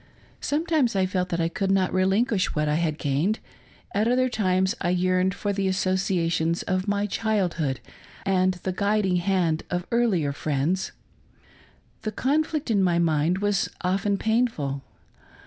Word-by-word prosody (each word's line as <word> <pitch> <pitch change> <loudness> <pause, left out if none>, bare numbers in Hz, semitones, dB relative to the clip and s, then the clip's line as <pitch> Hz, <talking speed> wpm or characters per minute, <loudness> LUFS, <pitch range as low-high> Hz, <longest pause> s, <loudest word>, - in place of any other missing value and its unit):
Sometimes 300 - +1
I 190 -1 +3
felt 185 -1 -1
that 170 - -1
I 165 - +2
could 190 +3 -2
not 190 -1 +2
relinquish 190 +2 +1
what 150 0 +1
I 150 - +1
had 155 -1 0
gained; 155 +10 0 0.6
at 210 +3 +2
other 255 +1 +2
times 190 -3 +1
I 175 - 0
yearned 185 +1 +1
for 205 0 -2
the 195 -1 0
associations 185 -3 0
of 185 0 -1
my 205 0 +1
childhood 185 - -1 0.5
and 185 -1 +2
the 180 +1 -4
guiding 200 -1 +1
hand 175 -3 +1
of 180 0 -2
earlier 200 -12 +2
friends. 155 +6 -1 1.1
The 215 - -3
conflict 300 +3 0
in 200 -3 +3
my 175 -2 +2
mind 170 +3 +1
was 205 -2 +1
often 195 +2 +1
painful. 220 - 0
185 Hz, 145 wpm, -25 LUFS, 170-205 Hz, 1.1 s, I